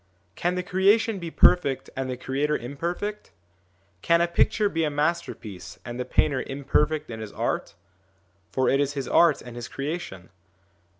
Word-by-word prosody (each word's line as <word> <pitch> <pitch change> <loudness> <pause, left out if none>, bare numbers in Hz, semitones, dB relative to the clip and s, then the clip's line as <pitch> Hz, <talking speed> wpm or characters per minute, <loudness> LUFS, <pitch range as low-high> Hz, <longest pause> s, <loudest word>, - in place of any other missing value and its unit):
Can 175 +1 -1
the 180 - -2
creation 200 +3 +3
be 170 -2 -5
perfect 145 -5 +3
and 130 -1 -3
the 125 - -3
creator 140 +4 0
im 125 +4 -7
perfect? 180 +7 -3 0.7
Can 170 0 +4
a 170 - +3
picture 205 +5 +2
be 165 -4 -1
a 155 - +1
masterpiece 145 - -3
and 120 0 -6
the 125 - -2
painter 130 +1 +1
imperfect 145 +2 0
in 110 - -6
his 110 -2 -7
art? - - -2 0.8
for 130 - +1
it 135 - +3
is 145 0 +1
his 140 -2 -4
art 170 -4 +4
and 120 -1 -10
his 120 -1 -6
creation. 140 - -5
150 Hz, 170 wpm, -26 LUFS, 130-170 Hz, 0.8 s, Can